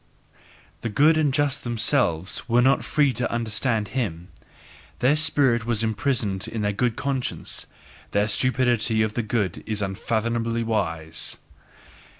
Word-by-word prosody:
The 115 - -2
good 150 +8 +4
and 155 -3 +2
just 145 0 0
themselves 115 - 0
were 120 +1 +4
not 135 +2 +3
free 145 -3 +2
to 120 +2 -2
understand 115 -2 -1
him; 95 -9 -3 0.7
their 135 +4 +3
spirit 140 -6 +3
was 115 -2 +1
imprisoned 110 -3 -1
in 110 -2 -4
their 105 0 0
good 115 +2 0
conscience. 135 -3 -3 0.4
The 100 +1 +1
stupidity 120 -1 +2
of 110 -1 -2
the 120 - -1
good 105 -4 -2
is 105 -1 -2
unfathomably 115 +4 -1
wise. 80 -8 -2
115 Hz, 135 wpm, -24 LUFS, 105-130 Hz, 0.7 s, good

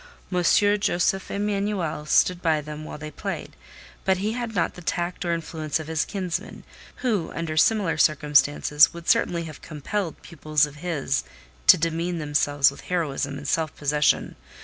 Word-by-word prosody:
M. 180 - +2
Josef 195 0 +2
Emanuel 200 -6 -2
stood 180 +3 +3
by 160 -3 +2
them 150 +1 -7
while - - -7
they 155 0 -8
played; - - -6 0.5
but 190 -1 +2
he 205 +4 -1
had 235 -2 -4
not 175 - +1
the 180 - -11
tact 175 +1 -2
or 175 - -1
influence 160 -2 -2
of 160 - -6
his 160 0 -1
kinsman, 185 -4 -4 0.4
who, 205 -9 0
under 165 -2 -3
similar 170 -2 +2
circumstances, 150 0 +4
would 170 -1 -10
certainly 170 -1 +2
have 155 -3 -9
compelled 165 +3 -4
pupils 155 -2 +1
of 145 0 -11
his 145 -4 -1 0.4
to - - +9
demean 165 +2 -1
themselves 145 -2 +2
with 140 - -12
heroism 145 -5 -1
and 140 0 -7
self 160 0 0
possession. 150 0 +1
165 Hz, 160 wpm, -24 LUFS, 150-180 Hz, 0.5 s, to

